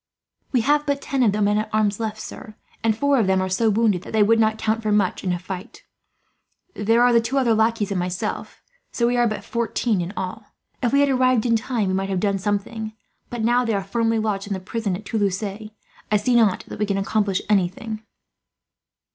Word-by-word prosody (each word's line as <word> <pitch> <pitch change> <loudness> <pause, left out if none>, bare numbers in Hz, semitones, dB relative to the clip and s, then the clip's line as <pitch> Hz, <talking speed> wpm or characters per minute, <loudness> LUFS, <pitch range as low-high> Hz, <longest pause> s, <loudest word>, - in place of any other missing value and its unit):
"We 250 - +3
have 295 +4 +2
but 280 -1 +1
ten 275 -2 -2
of 225 -5 +4
the 210 +1 0
men 205 +1 +2
at 215 0 -3
arms 210 -1 +1
left, 220 -1 -3
sir; 215 -1 -9 0.3
and 220 -1 +2
four 285 +1 +2
of 215 - +2
them 190 0 +3
are 185 0 -1
so 220 +4 +2
wounded 210 -4 +2
that - - -10
they 215 -1 +5
would 225 +2 +4
not 220 -1 +2
count 220 +1 0
for 215 -1 -1
much, 205 -3 +1
in 185 - 0
a 175 - 0
fight. 185 +4 -8 0.9
There 225 +3 +2
are 245 0 +5
the 235 - +5
two 240 +4 -2
other 245 -4 +3
lackeys 220 -1 +1
and 190 - 0
myself, 180 0 -4 0.3
so 235 - 0
we 240 +1 +2
are 240 -1 +3
but 215 - -4
fourteen, 230 -3 -1
in 175 +2 -4
all. 190 +3 -5 0.4
If 240 - +1
we 280 - +4
had 285 - +3
arrived 255 -3 +3
in 230 -1 +3
time 225 -2 -1
we - - 0
might 195 +1 -1
have 190 -2 0
done 200 0 0
something 215 +2 -3 0.4
but, 240 -2 -4
now 240 +2 +3
they 230 -2 0
are 195 - -1
firmly 225 +3 0
lodged 210 -2 -1
in 200 - -2
the 190 - -3
prison 200 0 -3
at 205 +3 -9
Toulouse, 200 -2 -1
I 215 +1 -5
see 210 +5 0
not 220 -5 +3
that - - -8
we 210 - 0
can 200 -1 0
accomplish 195 -1 0
anything." 210 +2 0
215 Hz, 230 wpm, -22 LUFS, 200-230 Hz, 0.9 s, they